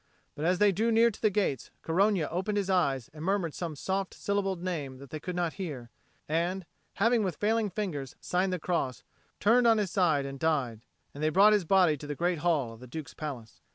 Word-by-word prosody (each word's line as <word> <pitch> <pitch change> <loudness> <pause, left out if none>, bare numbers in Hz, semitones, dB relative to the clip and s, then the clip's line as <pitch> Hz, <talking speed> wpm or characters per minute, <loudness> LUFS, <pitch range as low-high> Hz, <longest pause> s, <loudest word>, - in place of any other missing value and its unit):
But 150 - -4
as 180 +2 +3
they 205 +1 +5
drew 225 +5 +1
near 230 +1 +5
to - - -14
the 215 - +4
gates, 185 - -1
Corogna 185 -1 +2
opened 190 +5 -1
his 195 -1 0
eyes 140 -9 +1
and 155 0 -8
murmured 185 -4 0
some 165 -3 -4
soft 190 +5 -2
syllabled 195 -3 -1
name 150 -8 -3
that 140 0 -13
they 155 - -4
could 180 +3 -5
not 175 -2 -1
hear, 130 -9 -6 0.4
and, 175 +4 -1 0.3
having 230 +3 +3
with 185 -5 -2
failing 215 +2 +1
fingers 170 - -4
signed 185 +1 0
the 180 - 0
cross, 155 -7 -2 0.4
turned 235 +4 +4
on 225 -1 +5
his 205 -4 -1
side 160 -8 +2
and 135 0 -6
died. 135 -9 0 0.3
And 145 - -8
they 155 - +2
brought 200 +6 +6
his 205 -4 +2
body 180 -4 +4
to 145 - -9
the 145 - -3
great 175 +1 0
hall 145 -8 +1
of 115 - -14
the 125 - -11
Duke's 150 +4 -7
palace. 130 -7 -7
175 Hz, 220 wpm, -29 LUFS, 145-195 Hz, 0.4 s, brought